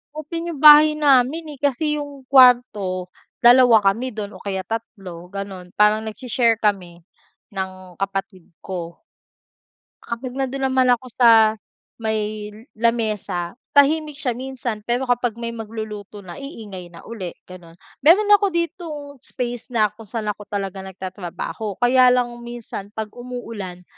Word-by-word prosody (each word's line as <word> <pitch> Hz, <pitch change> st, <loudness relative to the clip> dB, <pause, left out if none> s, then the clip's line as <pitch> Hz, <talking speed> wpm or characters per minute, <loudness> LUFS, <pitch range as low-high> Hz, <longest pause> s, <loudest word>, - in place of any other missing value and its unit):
Open 330 Hz, +3 st, -5 dB
yung 325 Hz, -, -5 dB
bahay 300 Hz, 0 st, +8 dB
namin, 295 Hz, +2 st, +2 dB
eh, -, -, -21 dB
kasi 295 Hz, +2 st, 0 dB
yung 280 Hz, -2 st, -10 dB
kwarto, 240 Hz, -9 st, +4 dB, 0.3 s
dalawa 245 Hz, -1 st, +7 dB, 0.2 s
kami 255 Hz, +4 st, -4 dB
dun 210 Hz, -2 st, -6 dB
o -, -, -12 dB
kaya 190 Hz, -2 st, -3 dB
tatlo, 185 Hz, -6 st, -7 dB
ganun. 195 Hz, -2 st, -7 dB
Parang 210 Hz, +1 st, +4 dB
nagshi-share 230 Hz, +1 st, 0 dB
kami 180 Hz, -6 st, -2 dB, 0.5 s
ng 185 Hz, -1 st, -6 dB
kapatid 195 Hz, -2 st, -4 dB
ko. 170 Hz, -3 st, -6 dB, 1.1 s
Kapag 245 Hz, +2 st, -5 dB
nandun 270 Hz, 0 st, -2 dB
naman 260 Hz, -1 st, +3 dB
ako 255 Hz, -, -16 dB
sa 240 Hz, -1 st, +5 dB, 0.7 s
may 215 Hz, -1 st, -2 dB, 0.3 s
lamesa, 215 Hz, -7 st, -1 dB, 0.2 s
tahimik 300 Hz, +1 st, +4 dB
siya 275 Hz, -4 st, -1 dB
minsan 250 Hz, -3 st, -5 dB
pero 245 Hz, +2 st, 0 dB
kapag 245 Hz, -3 st, 0 dB
may 235 Hz, 0 st, -5 dB
magluluto 215 Hz, -2 st, -7 dB
na 180 Hz, +8 st, -9 dB
iingay 205 Hz, -10 st, -8 dB
na 170 Hz, -, -14 dB
uli 195 Hz, -7 st, -7 dB
ganun. 175 Hz, -2 st, -13 dB, 0.2 s
Meron 385 Hz, +9 st, +5 dB
ako 410 Hz, 0 st, +6 dB
ditong 335 Hz, -2 st, -3 dB, 0.2 s
space 245 Hz, -1 st, -5 dB
na 220 Hz, -5 st, +1 dB
kung 215 Hz, 0 st, -14 dB
saan 215 Hz, 0 st, -3 dB
ako 205 Hz, 0 st, -11 dB
talaga 195 Hz, -1 st, -4 dB
nagtatrabaho 190 Hz, +2 st, -6 dB
kaya 255 Hz, +1 st, +6 dB
lang 250 Hz, -1 st, +3 dB
minsan 235 Hz, -4 st, -8 dB
'pag 215 Hz, -1 st, -4 dB
umuulan, 230 Hz, -7 st, -7 dB
230 Hz, 140 wpm, -21 LUFS, 195-260 Hz, 1.1 s, bahay